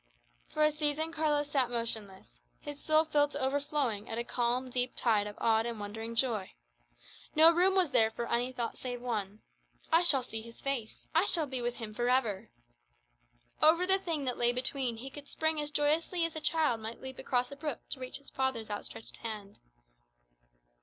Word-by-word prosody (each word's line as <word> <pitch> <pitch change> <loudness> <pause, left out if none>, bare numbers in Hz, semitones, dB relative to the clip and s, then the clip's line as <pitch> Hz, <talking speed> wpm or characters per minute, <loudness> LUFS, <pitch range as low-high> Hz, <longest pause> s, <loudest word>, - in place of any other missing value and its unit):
For 305 - 0
a 305 - +5
season 300 +1 0
Carlos 295 -2 0
sat 260 -4 +2
motionless, 210 - -5 0.2
his 290 -1 -8
soul 310 +1 +4
filled 290 -1 +2
to 285 - -3
overflowing 270 -5 -1
with 225 - -3
a 235 - -1
calm, 245 +2 -1
deep 250 0 -1
tide 215 -4 +2
of 205 - -8
awed 225 0 +2
and 230 -2 -4
wondering 225 +3 -6
joy. 230 -6 +2 0.8
No 320 +2 +8
room 365 +3 +3
was 365 -6 +3
there 225 -4 +4
for 235 +1 -5
any 245 +2 0
thought 240 -2 -4
save 245 -1 -4
one 215 -4 -4 0.5
"I 330 - +7
shall 285 -7 +4
see 225 -2 -5
His 230 +1 -13
face; 265 -6 -3
I 330 +4 +4
shall 330 -5 +2
be 260 -3 -4
with 240 0 -2
Him 220 -3 -7
for 240 +2 0
ever." 235 -6 +1 1.1
Over 335 +3 +5
the 385 +1 +4
Thing 325 -7 -2
that 250 - -1
lay 240 0 +5
between 250 -1 +2
he 265 +4 -7
could 285 +1 -10
spring 315 -1 0
as 295 - -3
joyously 315 +4 +2
as 330 -1 -4
a 315 - -4
child 300 -9 +2
might 225 +1 -6
leap 265 0 -8
across 250 +1 0
a - - -7
brook 295 -3 -5
to - - -2
reach 255 0 -6
his 280 - -6
father's 260 -5 -2
outstretched 205 +2 -5
hand. 210 -3 -7
255 Hz, 195 wpm, -31 LUFS, 230-300 Hz, 1.1 s, No